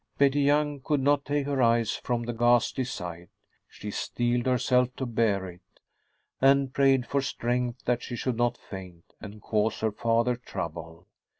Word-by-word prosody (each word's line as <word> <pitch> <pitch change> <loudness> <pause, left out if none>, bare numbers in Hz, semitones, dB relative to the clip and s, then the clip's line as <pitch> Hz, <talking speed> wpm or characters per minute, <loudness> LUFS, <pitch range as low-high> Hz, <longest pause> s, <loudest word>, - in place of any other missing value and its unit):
Betty 140 +1 +3
Young 145 0 +2
could 145 +2 0
not 140 +1 +2
take 145 -1 -1
her 140 -2 0
eyes 115 -1 +3
from 120 -1 -2
the 120 +1 -3
ghastly 120 +2 +2
sight. 85 -6 -7 0.4
She 105 - -8
steeled 120 +3 -1
herself 125 0 +2
to 130 - -3
bear 110 -5 0
it, 90 0 -12 0.8
and 135 0 +4
prayed 135 -2 +3
for 140 +2 0
strength 120 -2 -2
that 120 0 +1
she 120 - -6
should 125 0 -2
not 120 0 0
faint 90 -4 -11
and 105 0 -10
cause 110 0 0
her 110 -1 +1
father 115 +3 +1
trouble. 85 -6 -7
120 Hz, 165 wpm, -27 LUFS, 110-135 Hz, 0.8 s, and